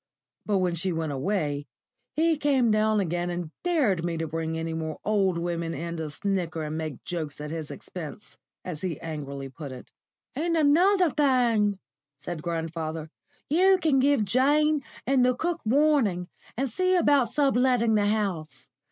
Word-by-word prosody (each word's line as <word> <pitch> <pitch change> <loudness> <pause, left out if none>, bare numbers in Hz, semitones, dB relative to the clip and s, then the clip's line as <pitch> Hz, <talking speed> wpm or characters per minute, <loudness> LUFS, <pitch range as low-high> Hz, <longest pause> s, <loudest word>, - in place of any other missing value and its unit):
But 205 -2 +2
when 180 -2 +1
she 170 +3 -1
went 160 -2 -2
away, 145 -1 -1 0.5
he 325 +1 +3
came 275 -6 +2
down 215 0 +3
again 175 -1 -1
and 175 -2 -4
dared 270 - +1
me 170 -1 -2
to 165 - -2
bring 160 +1 -3
any 165 0 -3
more 160 -1 -4
old 195 -4 +2
women 170 -1 -2
in 170 +1 -4
to 160 -1 -4
snigger 175 -1 -2
and 155 0 -4
make 155 -4 -5
jokes 155 -5 -4
at 150 0 -5
his 160 -2 -5
expense, 180 +3 -8 0.3
as 165 -5 -5
he 175 -5 -3
angrily 140 -4 -5
put 140 +1 -8
it. 125 -1 -11 0.4
"And 335 +4 0
another 345 +4 +4
thing," 240 -8 +2 0.4
said 155 +3 -6
grandfather, 160 -1 -4 0.4
"you 375 +5 +5
can 300 -6 +3
give 275 -5 +3
Jane 290 +6 +3 0.2
and 265 -1 +3
the 250 0 +3
cook 345 +5 -2
warning, 235 -9 +2 0.3
and 270 +2 0
see 370 +10 +1
about 285 -8 +4
sub 275 +1 +2
letting 245 -3 +3
the 205 -1 +3
house. 175 -11 -2
190 Hz, 165 wpm, -27 LUFS, 160-270 Hz, 0.5 s, you